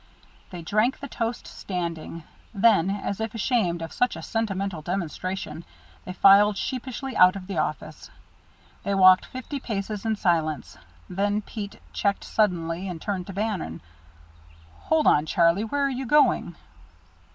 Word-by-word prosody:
They 175 Hz, -3 st, -8 dB
drank 215 Hz, +9 st, +1 dB
the 280 Hz, -, -6 dB
toast 235 Hz, -2 st, -3 dB
standing; 170 Hz, -3 st, -5 dB, 0.3 s
then, 200 Hz, -3 st, +4 dB
as 200 Hz, 0 st, -3 dB
if 220 Hz, 0 st, -4 dB
ashamed 195 Hz, -7 st, 0 dB
of 165 Hz, -, -7 dB
such 245 Hz, -, +1 dB
a -, -, -8 dB
sentimental 195 Hz, -6 st, -2 dB
demonstration, 180 Hz, -1 st, -4 dB, 0.4 s
they 185 Hz, -, -6 dB
filed 200 Hz, +2 st, +6 dB
sheepishly 260 Hz, +1 st, -4 dB
out 180 Hz, +1 st, +6 dB
of 190 Hz, -2 st, -7 dB
the 190 Hz, -4 st, -3 dB
office. 155 Hz, -2 st, -4 dB, 0.7 s
They 200 Hz, -, -1 dB
walked 185 Hz, -1 st, +6 dB
fifty 260 Hz, +2 st, -6 dB
paces 210 Hz, -3 st, -4 dB
in 220 Hz, -1 st, 0 dB
silence. 160 Hz, -6 st, 0 dB, 0.3 s
Then 205 Hz, +3 st, -1 dB
Pete 205 Hz, -2 st, -7 dB
checked 200 Hz, -1 st, 0 dB
suddenly 180 Hz, -3 st, 0 dB
and 175 Hz, -3 st, -5 dB
turned 185 Hz, 0 st, -3 dB
to 195 Hz, -, -7 dB
Bannon. 195 Hz, -, -3 dB, 1.1 s
"Hold 315 Hz, -1 st, +2 dB
on, 150 Hz, +1 st, +4 dB
Charlie, 170 Hz, +6 st, +3 dB
where 285 Hz, +5 st, -1 dB
are -, -, +1 dB
you 260 Hz, 0 st, -4 dB
going?" 295 Hz, +4 st, +3 dB
195 Hz, 145 wpm, -25 LUFS, 175-225 Hz, 1.1 s, filed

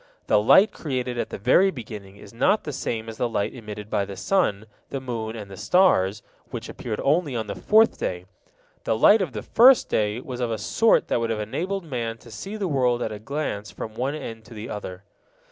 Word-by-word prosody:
The 105 Hz, -, +3 dB
light 195 Hz, -, +6 dB
created 125 Hz, -5 st, -3 dB
at -, -, -2 dB
the -, -, -5 dB
very 130 Hz, -, +4 dB
beginning 105 Hz, -, -8 dB
is 100 Hz, -, -14 dB
not 205 Hz, -, +2 dB
the 150 Hz, -, -5 dB
same 115 Hz, -4 st, -3 dB
as 110 Hz, -1 st, -7 dB
the 120 Hz, -, 0 dB
light 100 Hz, -3 st, -1 dB
emitted 105 Hz, -4 st, -8 dB
by 100 Hz, -, 0 dB
the 100 Hz, -1 st, -7 dB
sun, 110 Hz, -, +1 dB, 0.2 s
the 135 Hz, -, -3 dB
moon, 115 Hz, -4 st, -4 dB
and 105 Hz, -3 st, -8 dB
the -, -, -8 dB
stars, 105 Hz, -, +3 dB, 0.3 s
which -, -, -6 dB
appeared 110 Hz, -3 st, -5 dB
only 145 Hz, -1 st, +1 dB
on 110 Hz, -2 st, -2 dB
the 100 Hz, -, -4 dB
fourth 220 Hz, -, +3 dB
day. 90 Hz, 0 st, -3 dB, 0.6 s
The 110 Hz, -, 0 dB
light 210 Hz, -, +6 dB
of 165 Hz, -9 st, -2 dB
the 105 Hz, -, -5 dB
first 255 Hz, +2 st, +6 dB
day 105 Hz, +1 st, 0 dB
was 125 Hz, -1 st, -7 dB
of 120 Hz, -2 st, -1 dB
a 110 Hz, -, -1 dB
sort 220 Hz, -, +2 dB
that -, -, +1 dB
would 115 Hz, 0 st, -1 dB
have 110 Hz, -1 st, -1 dB
enabled 180 Hz, -, -3 dB
man 120 Hz, -7 st, -4 dB
to 115 Hz, 0 st, -15 dB
see 195 Hz, -, -7 dB
the 205 Hz, -3 st, -2 dB
world 125 Hz, -5 st, +1 dB
at 110 Hz, -, -3 dB
a 105 Hz, -, -6 dB
glance 110 Hz, -4 st, -4 dB
from 110 Hz, -, -7 dB
one 130 Hz, +6 st, -2 dB
end 115 Hz, -7 st, -7 dB
to 115 Hz, -, -12 dB
the 110 Hz, +2 st, -7 dB
other. 95 Hz, -2 st, -7 dB
115 Hz, 225 wpm, -24 LUFS, 105-145 Hz, 0.6 s, light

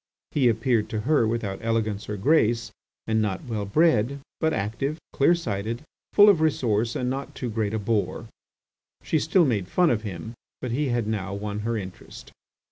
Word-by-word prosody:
He 135 Hz, -5 st, +3 dB
appeared 115 Hz, -1 st, +1 dB
to 110 Hz, -, -2 dB
her 140 Hz, -2 st, +3 dB
without 110 Hz, -4 st, -2 dB
elegance 110 Hz, -3 st, -1 dB
or 105 Hz, -, -3 dB
grace, 115 Hz, -1 st, +2 dB, 0.3 s
and 110 Hz, 0 st, +1 dB
not 100 Hz, -3 st, -2 dB
well 110 Hz, -4 st, -3 dB
bred, 140 Hz, +1 st, +2 dB, 0.2 s
but 160 Hz, -1 st, +2 dB
active, 135 Hz, +6 st, -2 dB, 0.2 s
clear 170 Hz, +5 st, +4 dB
sighted, 115 Hz, -4 st, -3 dB, 0.3 s
full 205 Hz, 0 st, +8 dB
of 195 Hz, -6 st, +5 dB
resource, 120 Hz, -7 st, +1 dB
and 125 Hz, -, -1 dB
not 135 Hz, +2 st, -4 dB
too 125 Hz, -3 st, -4 dB
great 110 Hz, -1 st, -1 dB
a -, -, +1 dB
bore. 105 Hz, 0 st, -1 dB, 0.8 s
She 160 Hz, -, +1 dB
still 170 Hz, +4 st, +3 dB
made 105 Hz, -9 st, 0 dB
fun 175 Hz, -, +3 dB
of 110 Hz, -3 st, 0 dB
him, 105 Hz, +1 st, -6 dB, 0.3 s
but 125 Hz, -, -4 dB
he 140 Hz, +4 st, 0 dB
had 120 Hz, -3 st, 0 dB
now 100 Hz, -3 st, -3 dB
won 105 Hz, 0 st, -4 dB
her 115 Hz, +2 st, -1 dB
interest. 95 Hz, -3 st, -9 dB
115 Hz, 180 wpm, -25 LUFS, 105-135 Hz, 0.8 s, full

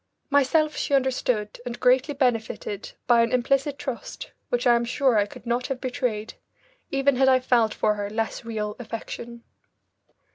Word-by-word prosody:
Myself 300 Hz, +2 st, +3 dB
she 280 Hz, -, 0 dB
understood 250 Hz, -5 st, 0 dB
and 245 Hz, -1 st, -6 dB
greatly 260 Hz, +4 st, +3 dB
benefited 225 Hz, -6 st, -1 dB
by 235 Hz, -1 st, +5 dB
an 230 Hz, -, +1 dB
implicit 275 Hz, +3 st, +1 dB
trust 265 Hz, -4 st, -6 dB, 0.2 s
which 245 Hz, +1 st, 0 dB
I 240 Hz, -1 st, +6 dB
am 235 Hz, -, +1 dB
sure 255 Hz, +1 st, +2 dB
I 205 Hz, -1 st, +3 dB
could 205 Hz, -, -13 dB
not 240 Hz, +2 st, -1 dB
have 270 Hz, -2 st, -3 dB
betrayed, 245 Hz, -4 st, -2 dB, 0.6 s
even 275 Hz, -1 st, +2 dB
had 265 Hz, 0 st, +5 dB
I 260 Hz, -1 st, +5 dB
felt 240 Hz, -3 st, +2 dB
for 210 Hz, -, +1 dB
her 205 Hz, -1 st, -4 dB
less 225 Hz, +2 st, -3 dB
real 215 Hz, -2 st, -3 dB
affection. 235 Hz, 0 st, -7 dB
245 Hz, 160 wpm, -25 LUFS, 225-265 Hz, 0.6 s, I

